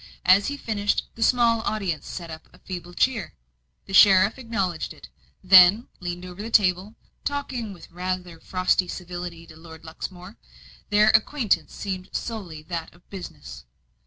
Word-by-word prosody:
As 195 Hz, +2 st, +5 dB
he 285 Hz, -, -3 dB
finished, 210 Hz, -5 st, -1 dB
the 230 Hz, -, -12 dB
small 235 Hz, -1 st, +3 dB
audience 190 Hz, -9 st, -3 dB
set 170 Hz, -3 st, -7 dB
up 160 Hz, 0 st, -10 dB
a -, -, -19 dB
feeble 175 Hz, -1 st, -8 dB
cheer. 230 Hz, -10 st, 0 dB, 0.5 s
The 195 Hz, -, -10 dB
sheriff 195 Hz, +4 st, +6 dB
acknowledged 195 Hz, -9 st, -3 dB
it, -, -, -14 dB, 0.3 s
then 190 Hz, +4 st, +7 dB
leaned 175 Hz, 0 st, -5 dB
over 180 Hz, +2 st, -9 dB
the 225 Hz, -, -5 dB
table 195 Hz, 0 st, +2 dB, 0.3 s
talking 265 Hz, -6 st, -3 dB
with 175 Hz, -4 st, -13 dB
rather 180 Hz, -1 st, -4 dB
frosty 185 Hz, +1 st, +1 dB
civility 175 Hz, -1 st, -7 dB
to 160 Hz, -, -15 dB
Lord 160 Hz, 0 st, -13 dB
Luxmore. 180 Hz, +5 st, -8 dB, 0.5 s
Their 210 Hz, +1 st, +5 dB
acquaintance 220 Hz, +1 st, +1 dB
seemed 185 Hz, -2 st, -5 dB
solely 185 Hz, -10 st, -5 dB
that 165 Hz, 0 st, -5 dB
of 175 Hz, -, -25 dB
business. 65 Hz, -, -9 dB
185 Hz, 150 wpm, -24 LUFS, 175-215 Hz, 0.5 s, then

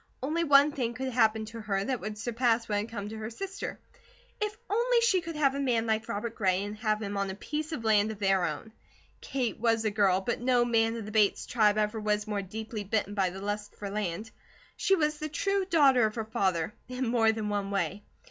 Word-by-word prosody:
Only 320 Hz, +5 st, 0 dB
one 290 Hz, -1 st, +6 dB
thing 240 Hz, -4 st, -2 dB
could 260 Hz, 0 st, -3 dB
happen 220 Hz, -2 st, +3 dB
to 225 Hz, +1 st, -8 dB
her 200 Hz, -2 st, -1 dB
that 255 Hz, +1 st, -1 dB
would 215 Hz, 0 st, -5 dB
surpass 235 Hz, +1 st, +1 dB
what 205 Hz, -1 st, 0 dB
had 210 Hz, +3 st, -4 dB
come 205 Hz, -2 st, -5 dB
to 220 Hz, -, -7 dB
her 215 Hz, 0 st, -4 dB
sister. 390 Hz, -, -6 dB, 0.6 s
If 420 Hz, 0 st, -2 dB
only 475 Hz, +3 st, +2 dB
she 395 Hz, -6 st, +3 dB
could 330 Hz, -1 st, -6 dB
have 280 Hz, -3 st, +3 dB
a 280 Hz, -, -3 dB
man 240 Hz, -5 st, +1 dB
like 220 Hz, 0 st, -1 dB
Robert 220 Hz, +3 st, -3 dB
Gray, 190 Hz, -3 st, +1 dB
and 205 Hz, +1 st, -5 dB
have 215 Hz, 0 st, 0 dB
him 200 Hz, 0 st, -3 dB
on 200 Hz, 0 st, -1 dB
a 190 Hz, -, -4 dB
piece 305 Hz, +9 st, -4 dB
of 275 Hz, -8 st, -4 dB
land 215 Hz, -1 st, +3 dB
of 220 Hz, -, -5 dB
their 195 Hz, -2 st, +2 dB
own. 220 Hz, -, -5 dB, 0.5 s
Kate 250 Hz, -6 st, -2 dB
was 225 Hz, -1 st, +2 dB
a 215 Hz, -, +2 dB
girl, 200 Hz, -3 st, +3 dB
but 235 Hz, +5 st, -2 dB
no 245 Hz, -1 st, +3 dB
man 225 Hz, -1 st, +2 dB
of 225 Hz, -3 st, -5 dB
the 215 Hz, -, -7 dB
Bates 210 Hz, -2 st, +2 dB
tribe 215 Hz, -3 st, +3 dB
ever 215 Hz, +1 st, 0 dB
was 210 Hz, 0 st, 0 dB
more 210 Hz, -2 st, -2 dB
deeply 215 Hz, +2 st, -6 dB
bitten 205 Hz, 0 st, -1 dB
by 195 Hz, -3 st, +1 dB
the 190 Hz, +2 st, -8 dB
lust 205 Hz, +1 st, -4 dB
for 200 Hz, -1 st, -6 dB
land. 210 Hz, +1 st, -3 dB, 0.4 s
She 390 Hz, -, +3 dB
was 300 Hz, -3 st, 0 dB
the 310 Hz, -, -3 dB
true 395 Hz, +5 st, 0 dB
daughter 275 Hz, -9 st, +5 dB
of 215 Hz, -, -7 dB
her 225 Hz, -2 st, -3 dB
father, 190 Hz, -4 st, 0 dB, 0.2 s
in 255 Hz, 0 st, -2 dB
more 230 Hz, -1 st, +4 dB
than 220 Hz, -1 st, -3 dB
one 200 Hz, -1 st, -1 dB
way. 195 Hz, 0 st, -2 dB
220 Hz, 235 wpm, -29 LUFS, 205-255 Hz, 0.6 s, one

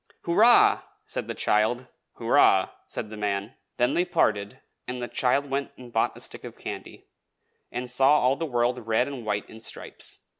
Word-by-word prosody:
"Hurrah!" 220 Hz, +8 st, +5 dB, 0.2 s
said -, -, -5 dB
the -, -, -4 dB
child. 110 Hz, +4 st, +1 dB, 0.3 s
"Hurrah!" -, -, +4 dB, 0.2 s
said 105 Hz, -, -6 dB
the 110 Hz, -, -7 dB
man. 100 Hz, +2 st, -2 dB, 0.2 s
Then 120 Hz, 0 st, +2 dB
they 175 Hz, -, +2 dB
parted, 110 Hz, -, 0 dB, 0.3 s
and 125 Hz, 0 st, -4 dB
the 120 Hz, -, -3 dB
child 130 Hz, +4 st, +1 dB
went 140 Hz, +1 st, -3 dB
and 120 Hz, -2 st, -12 dB
bought 115 Hz, -, +1 dB
a -, -, -9 dB
stick -, -, -7 dB
of -, -, -9 dB
candy, -, -, -8 dB, 0.7 s
and 125 Hz, +1 st, -4 dB
saw 135 Hz, +4 st, +5 dB
all 130 Hz, +2 st, +3 dB
the 165 Hz, +3 st, -3 dB
world 120 Hz, -2 st, 0 dB
red 115 Hz, +3 st, +2 dB
and 135 Hz, -4 st, -6 dB
white 105 Hz, -1 st, -1 dB
in 110 Hz, -, -12 dB
stripes. 110 Hz, -, -5 dB
125 Hz, 180 wpm, -26 LUFS, 110-135 Hz, 0.7 s, Hurrah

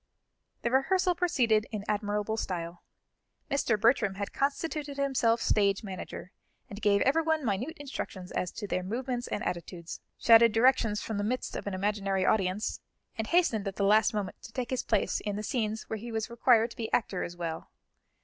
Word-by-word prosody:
The 235 Hz, -, 0 dB
rehearsal 360 Hz, +8 st, +3 dB
proceeded 240 Hz, -12 st, +2 dB
in 210 Hz, -2 st, -4 dB
admirable 210 Hz, +1 st, -1 dB
style. 175 Hz, -5 st, -4 dB, 0.7 s
Mr. 235 Hz, -6 st, +1 dB
Bertram 225 Hz, -3 st, +3 dB
had 200 Hz, 0 st, -5 dB
constituted 290 Hz, 0 st, -2 dB
himself 250 Hz, -5 st, +2 dB
stage 200 Hz, 0 st, +2 dB
manager, 190 Hz, -1 st, -7 dB, 0.4 s
and 205 Hz, +1 st, -8 dB
gave 200 Hz, -1 st, +3 dB
everyone 315 Hz, +1 st, +2 dB
minute 240 Hz, -, -2 dB
instructions 205 Hz, -, -6 dB
as 180 Hz, -, -2 dB
to 210 Hz, -, -5 dB
their 185 Hz, -, -1 dB
movements 245 Hz, +5 st, -3 dB
and 205 Hz, -, -3 dB
attitudes, 170 Hz, -1 st, -5 dB, 0.2 s
shouted 230 Hz, -1 st, +6 dB
directions 225 Hz, -3 st, +3 dB
from 220 Hz, -2 st, -3 dB
the -, -, -1 dB
midst 250 Hz, +5 st, -2 dB
of -, -, -5 dB
an 200 Hz, -, -2 dB
imaginary 195 Hz, -1 st, 0 dB
audience, 195 Hz, 0 st, 0 dB, 0.3 s
and 220 Hz, -2 st, -3 dB
hastened 230 Hz, -, +2 dB
at 195 Hz, -, -4 dB
the 200 Hz, -, -1 dB
last 215 Hz, +2 st, +5 dB
moment 205 Hz, -3 st, -4 dB
to -, -, -11 dB
take 245 Hz, 0 st, -4 dB
his 255 Hz, -, 0 dB
place -, -, 0 dB
in 205 Hz, -1 st, -3 dB
the 210 Hz, -, -4 dB
scenes 220 Hz, -2 st, -2 dB
where 220 Hz, -, -5 dB
he 235 Hz, +2 st, -7 dB
was 220 Hz, +1 st, -3 dB
required 235 Hz, -1 st, +4 dB
to -, -, -12 dB
be 225 Hz, -2 st, -4 dB
actor 200 Hz, -5 st, 0 dB
as 175 Hz, -, -5 dB
well. 165 Hz, -2 st, -5 dB
220 Hz, 180 wpm, -29 LUFS, 200-250 Hz, 0.7 s, shouted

